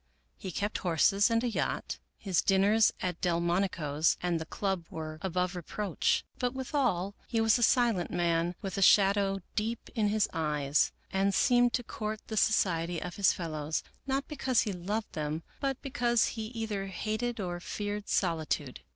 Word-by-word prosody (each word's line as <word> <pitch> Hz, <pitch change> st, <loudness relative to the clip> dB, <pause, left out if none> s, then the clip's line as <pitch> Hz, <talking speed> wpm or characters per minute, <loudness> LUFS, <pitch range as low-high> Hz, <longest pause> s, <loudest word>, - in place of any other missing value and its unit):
He -, -, -7 dB
kept 205 Hz, +5 st, -2 dB
horses 195 Hz, +4 st, +3 dB
and 230 Hz, +1 st, +2 dB
a -, -, +1 dB
yacht. 230 Hz, -, -2 dB, 0.2 s
His 190 Hz, -4 st, +1 dB
dinners 205 Hz, +3 st, +4 dB
at 180 Hz, -2 st, -2 dB
Delmonico's 170 Hz, -3 st, +1 dB
and 175 Hz, -2 st, 0 dB
the 160 Hz, -, -6 dB
club 190 Hz, -3 st, -2 dB
were 155 Hz, -1 st, -6 dB
above 180 Hz, 0 st, -1 dB
reproach. 180 Hz, +2 st, -1 dB
But 250 Hz, +1 st, -1 dB
with 265 Hz, +1 st, -5 dB
all 200 Hz, -9 st, +1 dB
he 230 Hz, -, 0 dB
was 225 Hz, +1 st, +4 dB
a -, -, -3 dB
silent 230 Hz, -6 st, +3 dB
man 170 Hz, 0 st, 0 dB
with 195 Hz, 0 st, -3 dB
a -, -, -1 dB
shadow 195 Hz, 0 st, +4 dB
deep 225 Hz, +2 st, -3 dB
in 215 Hz, -2 st, +1 dB
his 210 Hz, 0 st, +2 dB
eyes, 150 Hz, -3 st, +1 dB, 0.2 s
and 195 Hz, 0 st, +2 dB
seemed 245 Hz, -2 st, +4 dB
to 245 Hz, -, 0 dB
court 215 Hz, -1 st, -4 dB
the 220 Hz, -, -3 dB
society 175 Hz, -6 st, +2 dB
of 180 Hz, +1 st, -6 dB
his 200 Hz, -3 st, +5 dB
fellows, 155 Hz, -3 st, -3 dB, 0.2 s
not 270 Hz, +1 st, -1 dB
because 265 Hz, -5 st, +1 dB
he 210 Hz, -4 st, -2 dB
loved 205 Hz, +5 st, -3 dB
them, 155 Hz, +1 st, -3 dB, 0.2 s
but 270 Hz, -2 st, -1 dB
because 240 Hz, -4 st, +2 dB
he 220 Hz, -2 st, -5 dB
either 220 Hz, -4 st, -4 dB
hated 215 Hz, +5 st, -3 dB
or 175 Hz, -3 st, -3 dB
feared 205 Hz, +3 st, -4 dB
solitude. 160 Hz, -6 st, -1 dB
195 Hz, 170 wpm, -30 LUFS, 170-225 Hz, 0.2 s, his